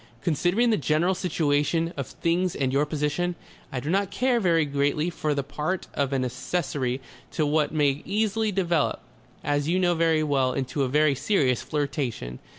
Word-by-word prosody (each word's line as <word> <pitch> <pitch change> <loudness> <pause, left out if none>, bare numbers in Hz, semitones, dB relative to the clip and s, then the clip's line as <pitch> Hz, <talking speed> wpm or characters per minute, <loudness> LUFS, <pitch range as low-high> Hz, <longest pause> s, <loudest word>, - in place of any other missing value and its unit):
"Considering 180 - +2
the 215 - +3
general 155 +4 +2
situation 165 -1 0
of 140 -3 -4
things 175 +2 0
and 130 -2 0
your 145 +2 +2
position, 150 +4 -1 0.4
I 130 - -2
do 145 +5 -3
not 195 +1 +1
care 250 +2 +1
very 165 -6 +3
greatly 145 +4 0
for 150 -3 -1
the 140 - -1
part 150 +6 -3
of 140 -1 0
an 130 -2 0
accessory 130 -1 -2 0.3
to 155 - +1
what 150 0 +1
may 145 -2 +1
easily 215 +1 0
develop, 175 - 0 0.4
as 145 +1 0
you 180 - +2
know 180 -1 +3
very 165 -2 +2
well, 135 -4 +1
into 135 +2 -2
a 135 - +2
very 150 +1 +3
serious 135 - +1
flirtation. 140 - -3
150 Hz, 170 wpm, -26 LUFS, 140-175 Hz, 0.4 s, the